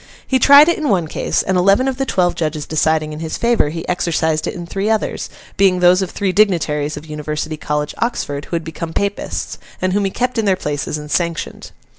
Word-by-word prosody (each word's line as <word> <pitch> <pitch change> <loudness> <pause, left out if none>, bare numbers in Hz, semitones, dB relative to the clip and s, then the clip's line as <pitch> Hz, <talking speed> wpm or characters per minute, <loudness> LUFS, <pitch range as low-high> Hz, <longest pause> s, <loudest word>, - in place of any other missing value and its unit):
He 260 - +1
tried 285 +4 +8
it 340 - +1
in 300 -3 -1
one 175 -5 +1
case, - - -1
and, 190 - -1
eleven 200 +8 +3
of 265 -2 -1
the 270 -1 -2
twelve 180 -1 +1
judges 155 -3 -3
deciding 155 0 0
in 150 - -7
his 160 -1 -4
favour, 235 -10 +2
he 165 +2 -6
exercised 160 -3 0
it - - -4
in 175 - -6
three 195 +4 -2
others, 220 -1 -1 0.3
being 190 -2 +4
those 180 +1 +5
of 190 - -2
three 195 0 -1
dignitaries 155 -7 +1
of 150 - -8
University 150 0 -4
College, 150 -1 -3
Oxford, 145 -12 -2
who - - -4
had 165 - -2
become 160 0 -6
Papists, 200 0 -3 0.2
and 185 0 0
whom 200 0 +1
he - - +1
kept 250 +3 -1
in 220 - 0
their 195 -2 +3
places 150 -3 -3
and 150 0 -9
sanctioned. 170 -2 -2
175 Hz, 220 wpm, -18 LUFS, 155-200 Hz, 0.3 s, tried